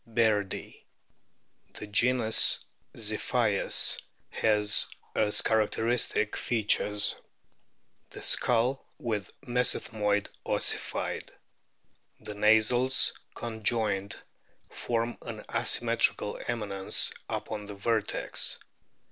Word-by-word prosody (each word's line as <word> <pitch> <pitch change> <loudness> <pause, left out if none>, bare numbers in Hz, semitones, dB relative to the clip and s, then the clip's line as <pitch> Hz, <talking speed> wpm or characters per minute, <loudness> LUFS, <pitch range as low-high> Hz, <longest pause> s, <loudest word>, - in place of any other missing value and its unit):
bairdi. 110 -4 -1 0.9
The - - -6
genus 115 +2 +4 0.3
ZlPHIUS - - +1 0.3
has 105 -1 +3 0.3
as 105 -1 +2
characteristic 110 0 +1
features: 105 -2 +2 1.0
the - - -10
skull 125 +3 +2
with 110 -4 -4
mesethmoid 110 -5 0 0.2
ossified; - - -2 0.9
the 105 - -7
nasals 110 +5 +3 0.2
con 115 -2 -7
joined 105 -3 0 0.6
form 115 0 -3
an - - -8
asymmetrical 115 -3 0
eminence 100 -5 0 0.2
upon 105 -1 -5
the 105 - -8
vertex. 105 +1 0
110 Hz, 75 wpm, -28 LUFS, 105-120 Hz, 1.0 s, genus